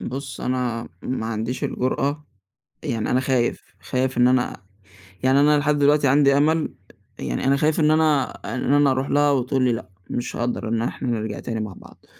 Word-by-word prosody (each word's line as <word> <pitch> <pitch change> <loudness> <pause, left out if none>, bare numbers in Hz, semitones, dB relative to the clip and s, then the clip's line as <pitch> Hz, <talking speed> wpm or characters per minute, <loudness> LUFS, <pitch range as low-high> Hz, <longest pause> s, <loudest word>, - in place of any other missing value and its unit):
بُص 135 +2 -6
أنا 125 -2 -2
ما 120 -3 -3
عنديش 115 +3 -3
الجرأة 140 +3 -1 0.6
يعني 115 -6 -2
أنا 125 - +3
خايف، 130 -2 0 0.2
خايف 130 0 -1
إن 125 0 +5
أنا 125 -1 +1 0.6
يعني 135 +2 +4
أنا 150 +1 +5
لحد 150 0 +1
دلوقتي 145 0 +4
عندي 140 0 +4
أمل، 155 +2 +1 0.5
يعني 65 - -3
أنا 135 +1 +4
خايف 155 +2 +1
إن 155 0 +4
أنا 155 -4 +2 0.2
إن 130 +2 0
أنا 145 -2 +4
أرُوح 130 +1 -1
لها 145 0 +3
وتقول 130 0 +1
لي 125 - +3
لأ، 115 - -6 0.2
مش 120 - -3
هاقدَر 120 -1 -2
إن 115 0 0
إحنا 125 +1 -3
نرجَع 110 -2 -3
تاني 115 -2 -4
مع 105 -3 -5
بعض. - - -17
130 Hz, 180 wpm, -23 LUFS, 120-145 Hz, 0.6 s, إن